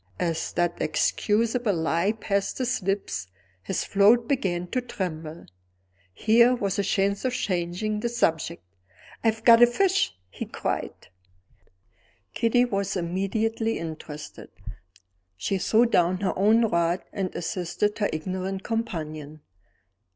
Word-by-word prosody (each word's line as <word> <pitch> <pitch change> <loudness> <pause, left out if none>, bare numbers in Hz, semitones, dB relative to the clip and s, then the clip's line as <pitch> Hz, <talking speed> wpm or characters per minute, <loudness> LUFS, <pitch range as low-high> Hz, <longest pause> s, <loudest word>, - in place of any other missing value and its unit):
As 165 -2 -1
that 175 0 0
excusable 220 +6 +1
lie 170 +5 +1
passed 200 -2 -2
his 255 -2 -1
lips, 180 - -2 0.3
his 95 - -2
float 220 +4 +4
began 185 -10 0
to 255 - -1
tremble. 165 -8 -5 0.7
Here 235 - +4
was 200 -3 -2
a - - +2
chance 200 0 0
of 255 -1 0
changing 185 +1 -2
the 235 - -1
subject 170 -7 0 0.6
"I've 225 -1 +1
got 230 -1 +7
a 240 - +9
fish!" 370 - +1
he - - -5
cried. - - -4 1.2
Kitty 245 +2 +3
was 200 -4 -2
immediately 215 +6 -1
interested. 155 -2 -8 0.9
She 195 - -1
threw 225 +5 +4
down 180 -4 +2
her 195 - 0
own 220 +4 +4
rod, 170 -3 +1
and 190 -2 -2
assisted 185 +5 -2
her 205 - +1
ignorant 185 +4 -4
companion. 155 -9 -4
195 Hz, 120 wpm, -26 LUFS, 170-225 Hz, 1.2 s, a